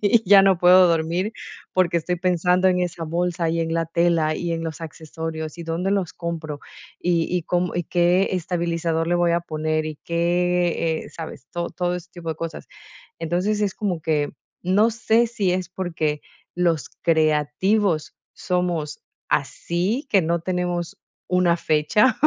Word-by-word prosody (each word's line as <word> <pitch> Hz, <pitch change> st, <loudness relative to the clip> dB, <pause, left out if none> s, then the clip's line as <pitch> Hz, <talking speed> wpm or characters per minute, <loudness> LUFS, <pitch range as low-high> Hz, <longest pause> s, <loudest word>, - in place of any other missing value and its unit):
y 215 Hz, +2 st, +4 dB
ya 200 Hz, -1 st, +9 dB
no 195 Hz, -2 st, +4 dB
puedo 180 Hz, +1 st, +7 dB
dormir 170 Hz, +5 st, 0 dB, 0.4 s
porque 180 Hz, -2 st, +2 dB
estoy 180 Hz, +2 st, -2 dB
pensando 180 Hz, +1 st, +2 dB
en 180 Hz, -1 st, +2 dB
esa 175 Hz, -2 st, -2 dB
bolsa, 170 Hz, +1 st, -1 dB
y 165 Hz, 0 st, 0 dB
en 165 Hz, 0 st, -1 dB
la 165 Hz, 0 st, 0 dB
tela, 165 Hz, -1 st, +2 dB
y 175 Hz, -1 st, -2 dB
en 165 Hz, 0 st, -3 dB
los 160 Hz, 0 st, -5 dB
accesorios 160 Hz, 0 st, -6 dB
y -, -, -5 dB
dónde 170 Hz, +4 st, -1 dB
los 195 Hz, -4 st, -1 dB
compro, 160 Hz, -4 st, -5 dB, 0.4 s
y 170 Hz, -2 st, +1 dB
y 175 Hz, -, -1 dB
cómo 180 Hz, +2 st, -1 dB
y 175 Hz, -, -1 dB
qué 175 Hz, +3 st, +2 dB
estabilizador 170 Hz, -2 st, -1 dB
le 175 Hz, -, +2 dB
voy 175 Hz, -1 st, +2 dB
a 170 Hz, -, +2 dB
poner 155 Hz, -1 st, -2 dB
y 155 Hz, -1 st, -5 dB
qué 175 Hz, -1 st, +1 dB
eh, -, -, -11 dB
¿sabes?, 160 Hz, -5 st, -8 dB
todo 170 Hz, 0 st, -2 dB
todo 180 Hz, 0 st, -1 dB
ese 180 Hz, 0 st, -10 dB
tipo 170 Hz, -2 st, -8 dB
de 160 Hz, -, -4 dB
cosas. 165 Hz, -1 st, -6 dB, 0.5 s
Entonces, 180 Hz, +6 st, 0 dB
es 200 Hz, -1 st, 0 dB
como 190 Hz, -7 st, -2 dB
que, 150 Hz, -2 st, 0 dB, 0.3 s
no 200 Hz, +5 st, +3 dB
sé 225 Hz, +1 st, +2 dB
si 210 Hz, -6 st, 0 dB
es 180 Hz, -1 st, -2 dB
porque 165 Hz, -5 st, -2 dB, 0.3 s
los 170 Hz, -6 st, +1 dB
creativos 160 Hz, +3 st, +1 dB, 0.2 s
somos 175 Hz, -4 st, -2 dB, 0.3 s
así, 195 Hz, -, -1 dB
que 195 Hz, -3 st, +4 dB
no 170 Hz, +1 st, 0 dB
tenemos 175 Hz, -1 st, -2 dB, 0.3 s
una 180 Hz, -2 st, +3 dB
fecha 175 Hz, +10 st, +2 dB
175 Hz, 165 wpm, -23 LUFS, 165-180 Hz, 0.5 s, ya